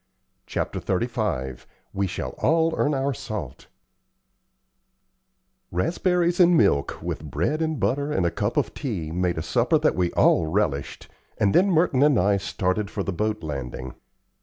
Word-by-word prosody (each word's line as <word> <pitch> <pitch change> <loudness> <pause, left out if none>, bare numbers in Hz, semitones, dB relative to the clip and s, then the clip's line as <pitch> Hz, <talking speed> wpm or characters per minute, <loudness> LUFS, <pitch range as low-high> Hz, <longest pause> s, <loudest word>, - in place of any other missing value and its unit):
Chapter - - -3
XXXV 95 - -2 0.3
"WE 100 0 0
SHALL 90 - -4
ALL 160 +2 +2
EARN 145 0 +1
OUR 135 +1 0
SALT" 105 - -7 2.0
Raspberries 175 - +1
and 175 -1 +6
milk, 85 - +2
with - - -4
bread 90 - -1
and 160 -2 -1
butter 140 +2 0
and 95 -10 +1
a 85 - +1
cup - - -2
of - - 0
tea, 95 - -4
made 90 0 -1
a 80 - -2
supper 80 - +2
that - - +2
we 90 -2 0
all 80 - +3
relished, 80 -6 -2 0.3
and 100 -1 +2
then 195 +3 +4
Merton 160 -6 +2
and 145 -3 +5
I 100 +1 +3
started 95 +1 -1
for 100 - -3
the 100 - -3
boat 105 +2 -2
landing. 65 -4 -5
100 Hz, 155 wpm, -24 LUFS, -, 2.0 s, and